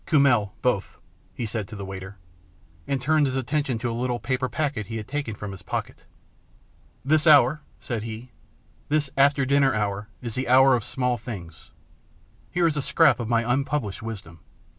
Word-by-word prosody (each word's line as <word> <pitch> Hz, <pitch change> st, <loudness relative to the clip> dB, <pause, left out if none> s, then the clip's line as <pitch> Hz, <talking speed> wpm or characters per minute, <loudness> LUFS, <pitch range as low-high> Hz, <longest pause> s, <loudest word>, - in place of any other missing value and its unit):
Kummel 130 Hz, -, +3 dB
both," 125 Hz, -6 st, 0 dB, 0.3 s
he 120 Hz, -, -4 dB
said 110 Hz, -2 st, -3 dB
to 110 Hz, -, -9 dB
the 100 Hz, -1 st, -6 dB
waiter, 95 Hz, +1 st, -8 dB, 0.7 s
and 140 Hz, -, 0 dB
turned 150 Hz, +2 st, +2 dB
his 130 Hz, -, -2 dB
attention 135 Hz, -1 st, -1 dB
to 120 Hz, +1 st, -2 dB
a -, -, -3 dB
little 120 Hz, +1 st, -1 dB
paper 130 Hz, 0 st, -1 dB
packet 140 Hz, -9 st, -2 dB
he 115 Hz, -, -4 dB
had 105 Hz, -, -6 dB
taken 140 Hz, -6 st, -3 dB
from 105 Hz, -1 st, -6 dB
his 95 Hz, -1 st, -10 dB
pocket. -, -, -5 dB, 0.5 s
" -, -, -34 dB
This 155 Hz, +3 st, +3 dB
hour," 150 Hz, 0 st, +6 dB, 0.2 s
said 120 Hz, -3 st, -4 dB
he, 115 Hz, +3 st, -7 dB, 0.3 s
" -, -, -35 dB
this 145 Hz, -2 st, +1 dB
after 140 Hz, 0 st, +4 dB
dinner 135 Hz, -2 st, +3 dB
hour 105 Hz, -1 st, -2 dB
is 120 Hz, -3 st, -6 dB
the 130 Hz, +2 st, -2 dB
hour 130 Hz, +1 st, +7 dB
of 120 Hz, -, -2 dB
small 125 Hz, -1 st, -1 dB
things. 90 Hz, -8 st, -9 dB, 0.8 s
Here 175 Hz, -1 st, +1 dB
is 160 Hz, -3 st, +2 dB
a 145 Hz, -, 0 dB
scrap -, -, +4 dB
of 115 Hz, -2 st, -4 dB
my 115 Hz, -1 st, +2 dB
unpublished 130 Hz, -4 st, -1 dB
wisdom." 100 Hz, -7 st, -8 dB
125 Hz, 185 wpm, -25 LUFS, 110-140 Hz, 0.8 s, hour